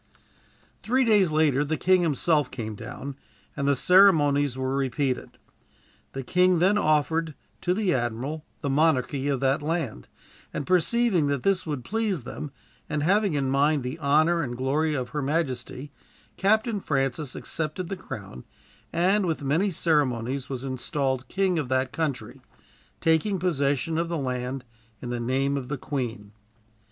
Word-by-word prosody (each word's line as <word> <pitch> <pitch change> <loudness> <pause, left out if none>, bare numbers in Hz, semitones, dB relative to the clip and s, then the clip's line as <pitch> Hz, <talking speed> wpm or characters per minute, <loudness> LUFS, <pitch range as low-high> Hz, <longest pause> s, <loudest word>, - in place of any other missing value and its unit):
Three 260 +3 +2
days 205 -6 +4
later 150 -3 +3
the 155 +2 -2
king 185 0 +3
himself 155 -2 +1
came 115 -4 -5
down, 130 +6 -7 0.4
and 140 -1 -1
the 140 - +4
ceremonies 145 -6 +4
were 130 0 -1
repeated. 135 -1 -2 0.8
The 135 - -4
king 180 +6 +3
then 190 +5 +3
offered 155 -2 +1 0.3
to 180 0 +1
the 200 -3 +1
admiral 130 +5 -2 0.2
the 145 - -2
monarchy 140 -2 +2
of 135 -3 0
that 135 +3 +2
land, 150 - -3 0.4
and 145 - -4
perceiving 185 - +2
that 140 -3 -1
this 195 -3 +1
would 145 -5 -3
please 210 - -1
them, 145 +4 -7 0.4
and 150 -1 -1
having 195 0 +2
in 135 -2 0
mind 145 +1 +2
the 125 +6 -5
honor 155 +4 +3
and 120 -4 -4
glory 150 +4 0
of 125 -3 -3
her 150 - -3
majesty, 135 -2 -2 0.4
Captain 215 +2 +2
Francis 135 -1 -1
accepted 160 +3 -3
the 195 - -3
crown, 95 - -9 0.5
and 190 +3 +2
with 160 -3 -2
many 160 +9 +2
ceremonies 135 -7 0
was 130 -2 -4
installed 130 0 -2
king 190 -1 +1
of 135 -5 -3
that 130 0 +1
country, 155 -5 -3 0.6
taking 165 +5 +2
possession 160 -2 0
of 170 0 -1
the 170 - -1
land 125 -1 -3 0.3
in 120 - -6
the 120 - -2
name 135 +4 0
of 130 -2 -5
the 145 +2 -3
Queen. 120 -7 -4
145 Hz, 155 wpm, -26 LUFS, 130-170 Hz, 0.8 s, days